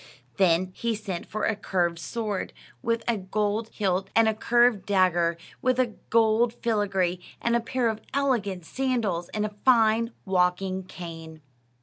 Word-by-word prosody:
Then 185 -1 +3
he 230 +2 -1
sent 195 -5 -5
for 215 - -4
a 220 - +1
curved 175 -4 -1
sword 210 +2 -3 0.3
with 230 0 0
a 235 -2 +2
gold 210 +3 -1
hilt, 195 -2 -1
and 225 0 +5
a 220 - +3
curved 235 -2 +2
dagger 175 -4 +2 0.2
with 255 -3 0
gold 230 +1 +3
filigree, 195 -6 0 0.2
and 235 0 +1
a - - +4
pair 245 +1 -1
of 220 -1 -2
elegant 225 -11 0
sandals, 225 -9 -1
and 210 0 -1
a 210 -1 -6
fine 230 -2 +4
walking 185 0 +1
cane. 165 -3 -9
210 Hz, 145 wpm, -26 LUFS, 185-230 Hz, 0.3 s, and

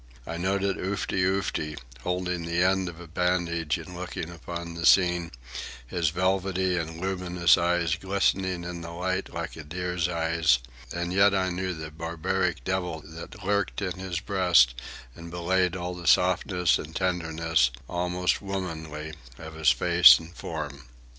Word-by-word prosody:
I 85 - -5
noted 95 +2 0
Oofty 95 0 -1
Oofty, 90 -5 -1 0.2
holding 90 +1 -2
the 85 +1 +1
end 95 0 +2
of 85 -1 -11
a 85 - -10
bandage 85 -2 0
and 85 +2 -9
looking 90 -1 -5
upon 85 0 -6
the 85 0 -6
scene, 90 -1 +4 0.6
his 85 +4 0
velvety 95 +1 0
and 80 -1 -4
luminous 90 -2 +2
eyes 85 -1 +1
glistening 95 -2 0
in 85 0 -6
the 85 - -7
light 95 +3 -2
like 85 0 -5
a 80 - -8
deer's 90 +2 -2
eyes, 80 -5 +2 0.3
and 85 +1 -3
yet 100 +1 +5
I 95 -1 +1
knew 90 0 -2
the 80 0 -7
barbaric 85 +2 -2
devil 90 -4 -2
that 80 +5 -10
lurked 100 0 0
in 95 -1 -3
his 95 -2 -3
breast 90 -11 +4 0.4
and 85 0 -9
belied 90 +1 +1
all 90 0 -4
the 90 -2 -7
softness 90 0 +3
and 80 +1 -8
tenderness, 80 -6 +1 0.2
almost 90 +1 0
womanly, 80 -6 -5 0.2
of 80 -1 -9
his 80 0 +3
face - - +7
and 80 +1 -11
form. 75 -4 -6
90 Hz, 155 wpm, -27 LUFS, 85-95 Hz, 0.6 s, face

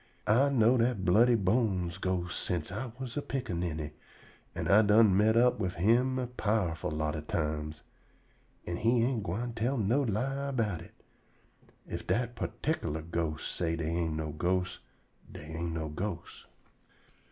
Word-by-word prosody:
I 125 +7 +4
know 125 -2 +4
dat 115 -5 +1
Bloody 115 +7 +5
Bones 95 -4 +1
ghost 90 -2 -1
sence 85 0 -2
I 115 +5 -4
was 130 -3 -6
a - - 0
piccaninny, 85 - -3 0.6
an' - - -2
I 105 +2 +7
done 105 -2 +5
met 110 +3 +4
up 125 -1 +4
wif 90 -4 -2
him 120 +8 +3
a 130 - -1
powerful 105 -8 -1
lot 75 0 -2
o' 75 - -3
times, 75 -1 -3 0.8
an' 85 0 -3
he 115 +3 +3
ain't 120 -2 0
gwine 105 +6 -3
tell 120 +4 0
no 115 +6 +2
lie 135 +4 -1
erbout 110 -10 -1
it. 85 - -14 0.9
Ef - - -6
dat 120 0 0
perticklar 80 - -3
ghost 80 -2 -2
say 85 -1 0
dey 80 -1 -2
ain't 85 -1 -1
no 80 -1 -3
ghosts, 90 +3 -1 0.5
dey - - -9
ain't 85 +1 -4
no 80 -1 -3
ghosts." 85 +3 -6
100 Hz, 155 wpm, -30 LUFS, 85-120 Hz, 0.9 s, I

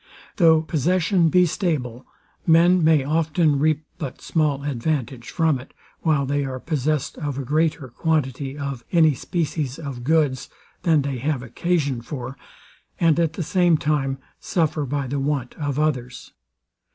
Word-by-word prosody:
Though 160 -4 +5
possession 170 +3 +2
be 180 +2 +5
stable, 140 - -2 0.4
men 170 +2 +5
may 155 -3 +4
often 155 0 +1
reap 155 +1 +1 0.2
but 140 -5 -5
small 150 -4 0
advantage 130 -2 -2
from 160 -5 +1
it, 125 - -14 0.3
while 150 -4 +2
they 145 +1 0
are 130 -1 -4
possessed 150 -1 -2
of 145 -4 -3
a 140 - -3
greater 155 0 0
quantity 140 0 -1
of 140 -4 -5
any 160 -3 +5
species 150 -1 -3
of 140 -6 -6
goods 145 -3 +1 0.3
than 160 -4 +3
they 135 -2 -3
have 140 -1 -1
occasion 140 0 -1
for, 130 0 -6 0.6
and 165 -1 +3
at 165 -2 +1
the 170 - -3
same 175 -1 +3
time 145 -3 0 0.2
suffer 155 -4 0
by 140 +1 -2
the 140 +2 -2
want 135 -3 -2
of 145 -2 -2
others. 130 -5 -2
150 Hz, 150 wpm, -23 LUFS, 135-160 Hz, 0.6 s, Though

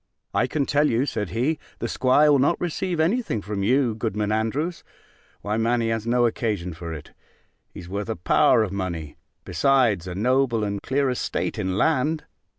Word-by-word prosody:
"I - - +2
can 145 -3 -1
tell 150 +2 +2
you," 120 +4 +1
said 105 -9 -3
he, 130 - 0 0.2
"the - - -3
'squire 145 +4 +4
will 140 - +4
not 145 +6 +2
receive 175 0 -2
any 190 +11 +2
thing 115 - -3
from 105 -1 -3
you, 125 +3 +2
Goodman 105 -1 -2
Andrews. 135 +11 -1 0.6
Why, 105 +1 -2
man, 115 +2 +1
he 115 - 0
has 115 0 -2
no 120 0 +3
occasion 105 -7 -1
for 85 +1 -7
it: 75 -3 -8 0.6
he's 85 - -10
worth 100 +4 -4
a 110 - -1
power 90 +5 +3
of 100 - -3
money, 85 -6 -4 0.3
besides 125 - +2
a 90 - -5
noble 125 +1 +1
and 100 -1 -2
clear 140 +1 0
estate 125 -2 -2
in 95 -2 -1
land. 155 +3 +1
115 Hz, 185 wpm, -24 LUFS, 100-140 Hz, 0.6 s, squire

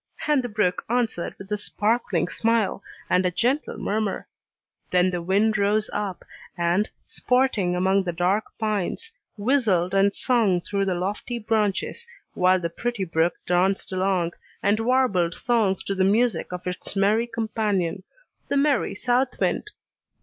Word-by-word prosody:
And 300 -3 +3
the 245 - -4
brook 205 -4 0
answered 235 -7 -1
with 195 +1 -12
a 210 - +1
sparkling 210 -5 0
smile, 225 -1 0 0.3
and 180 +1 +3
a 180 - +2
gentle 250 - 0
murmur. 210 -1 -2 0.6
Then 180 0 +3
the 175 -1 -2
wind 205 +5 +2
rose 210 +1 +1
up, 200 -3 -3 0.3
and, 175 +4 +1 0.2
sporting 250 -8 +1
among 190 +2 +2
the 175 - -2
dark 180 +5 +1
pines, 215 - -2 0.3
whistled 205 -6 +2
and 195 +1 +4
sung 220 -7 +2
through 195 +2 -2
the 185 -2 0
lofty 205 +7 -3
branches, 220 - -1 0.3
while 185 +1 +3
the 170 - -1
pretty 240 +2 -3
brook 165 0 +1
danced 185 +3 +1
along, 185 -2 +1 0.3
and 205 +2 +2
warbled 225 -8 +2
songs 220 -6 +1
to 195 - -2
the 190 -1 +1
music 220 +3 +2
of 180 0 -6
its 180 +2 -4
merry 210 +4 +2
companion, 210 -6 -1 0.5
the 280 - 0
merry 280 -1 +2
south 250 +1 0
wind! 425 - 0
200 Hz, 150 wpm, -24 LUFS, 185-230 Hz, 0.6 s, and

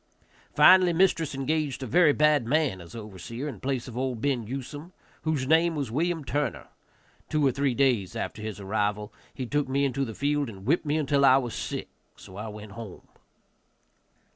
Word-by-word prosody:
Finally 185 -1 +7
mistress 165 -5 +2
engaged 140 -1 -1
a - - -3
very 160 +4 +5
bad 150 -4 +3
man 140 - +1
as 85 +5 -12
overseer, 115 +5 -7
in 125 -9 -6
place 130 -2 -2
of 120 - -9
old 130 -2 -2
Ben 125 -4 -1
Usome, 145 +7 -7 0.3
whose 155 -4 -1
name 165 +3 +3
was 140 -6 -3
William 165 +3 -1
Turner. 145 +1 -2 0.6
Two 150 -2 +1
or 135 - +4
three 135 -1 0
days 120 -9 +1
after 105 - -4
his 105 -2 -5
arrival 105 +1 -2 0.2
he 130 - -5
took 145 +2 -1
me 140 +1 +1
into 135 0 -1
the 115 -5 -5
field 145 -1 0
and 95 -3 -11
whipped 155 +4 +1
me 150 +2 +1
until 140 -2 +1
I 130 -1 +7
was 125 -4 -2
sick, - - -4 0.3
so 95 - -13
I 105 +3 -6
went 105 -1 -9
home. 105 -3 -10
135 Hz, 185 wpm, -27 LUFS, 115-150 Hz, 0.6 s, Finally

